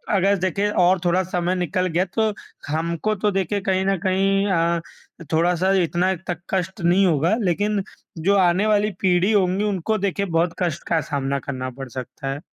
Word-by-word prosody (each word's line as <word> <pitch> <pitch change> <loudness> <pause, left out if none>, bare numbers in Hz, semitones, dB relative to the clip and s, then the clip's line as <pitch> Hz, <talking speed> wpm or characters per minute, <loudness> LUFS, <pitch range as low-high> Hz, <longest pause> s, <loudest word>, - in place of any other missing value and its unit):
अगर 200 +1 +3
देखें 190 +3 0
और 180 -1 +3
थोड़ा 180 +2 +2
समय 180 0 -1
निकल 180 +1 -1
गया, 180 +2 +1
तो 215 +3 0 0.3
हमको 170 +7 -1
तो 210 +1 0
देखें 195 +1 -1
कहीं 190 -1 +1
न 195 0 +1
कहीं 195 +1 +2
अ, 170 -1 +1 0.5
थोड़ा-सा 175 +3 +2
इतना 175 +3 +1
तक 175 -2 -3
कष्ट 190 0 -2
नहीं 180 +3 +4
होगा, 170 +3 +2
लेकिन 205 +2 0 0.4
जो 195 +5 +2
आने 185 +3 +3
वाली 210 0 +2
पीढ़ी 185 +2 +3
होंगी, 195 -1 +2
उनको 210 +1 0
देखें 200 -1 -2
बहुत 165 +1 +1
कष्ट 170 -3 -2
का 165 -1 +1
सामना 140 -1 -1
करना 130 -2 -5
पड़ 135 -1 -6
सकता 130 +3 -7
है। 135 +2 -3
185 Hz, 175 wpm, -22 LUFS, 170-195 Hz, 0.5 s, नहीं